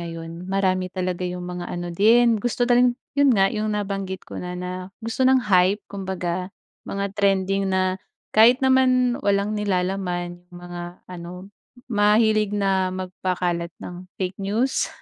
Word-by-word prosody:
ngayon 165 +1 -7
marami 185 -1 +1
talaga 185 -1 -3
yung 180 0 -5
mga 180 0 -5
ano 175 0 -4
din, 225 +3 +4
gusto 245 +1 0
na 245 - +2
rin 250 0 +5 0.2
yun 285 -1 +4
nga, 195 0 +3
yung 215 0 -1
nabanggit 195 -2 -4
ko - - -7
na 180 0 -5
na 180 +1 -5 0.2
gusto 255 +3 +1
ng 260 -2 +4
hype, 185 +3 +4
kumbaga. 185 -2 -4 0.4
Mga 200 0 -3
trending 195 -1 +1
na 185 0 0 0.3
kahit 240 +5 +6
naman 255 -1 +3
walang 200 0 +1
nilalaman 180 -3 -2
yung 175 - -13
mga 175 0 -8
ano, 180 +2 -9 0.4
mahilig 210 0 +3
na 190 -2 +1
magpakalat 180 -2 -2
ng 180 +1 -9
fake 185 +1 -4
news. 225 +7 0
190 Hz, 150 wpm, -23 LUFS, 180-210 Hz, 0.4 s, kahit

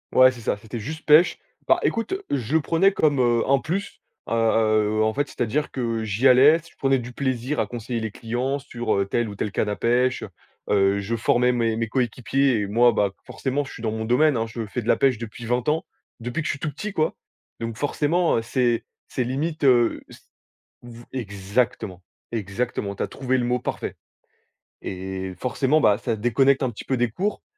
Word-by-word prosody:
Ouais, 130 0 +8
c'est 125 - -11
ça, 110 - 0
c'était 110 +3 -8
juste 155 +9 -7
pêche. 155 +3 +6 0.3
Bah, - - +4
écoute, 230 +10 0 0.2
je 135 +1 -1
le 160 - +4
prenais 185 +6 +3
comme, 150 -6 +2
heu, 120 -2 +3
un 135 0 +3
plus, 195 - -4 0.3
heu, - - -9
heu, 110 -1 +2
en 110 0 +1
fait, 145 +3 -1
c'est-à-dire 125 +6 -1
que 115 -3 -2
j'y 110 +6 +3
allais, 140 +6 +7
je 170 - -19
prenais 135 -1 +2
du 120 0 -6
plaisir 130 +2 -2
à - - +1
conseiller 120 0 -4
les 110 -1 -4
clients 120 +6 -2
sur, 120 -5 -3
heu, 100 0 +1
telle 120 +4 -1
ou 100 - -7
telle 105 - -3
canne 105 - 0
à 105 - -1
pêche, 125 +3 +1 0.5
heu, 100 0 +3
je 110 +4 -2
formais 125 +2 +3
mes 115 -2 0
mes 115 0 -2
coéquipiers 125 +1 +1
et 100 - -2
moi, 120 +4 +4
bah, 100 -2 +1
forcément, 140 +2 -2
je - - -10
suis 115 - -10
dans 110 - 0
mon 110 0 -3
domaine, 135 +4 +3
hein, 115 - 0
je 115 0 -5
fais 115 +4 -4
de 115 - -9
la - - +5
pêche 130 -4 +2
depuis 115 +1 -8
20 125 +1 -1
ans, 155 +2 +1 0.4
depuis 120 +7 -3
que - - -7
je - - +1
suis 145 - -8
tout 155 - -3
petit, 205 +9 -6
quoi. 155 -4 +1 0.5
Donc 115 -1 -4
forcément, 150 +6 +1
heu, - - 0
c'est 120 0 0 0.2
c'est 125 - -1
limite, 150 +5 -2
heu, 120 -3 +4
c - - -13 0.6
v 120 -1 -11
exactement, 100 -3 -2 0.3
exactement, 105 0 -2
tu - - -3
as - - -2
trouvé 130 -1 -1
le 125 - 0
mot 125 +1 +1
parfait. - - -4 0.9
Et 95 0 -5
forcément, 135 +4 +1
bah, 105 -7 +4
ça 120 -1 -1
déconnecte 130 +5 +2
un 130 - 0
petit 105 - -10
peu 130 - 0
des 120 -2 +1
cours. 200 - -2
120 Hz, 210 wpm, -24 LUFS, 110-135 Hz, 0.9 s, Ouais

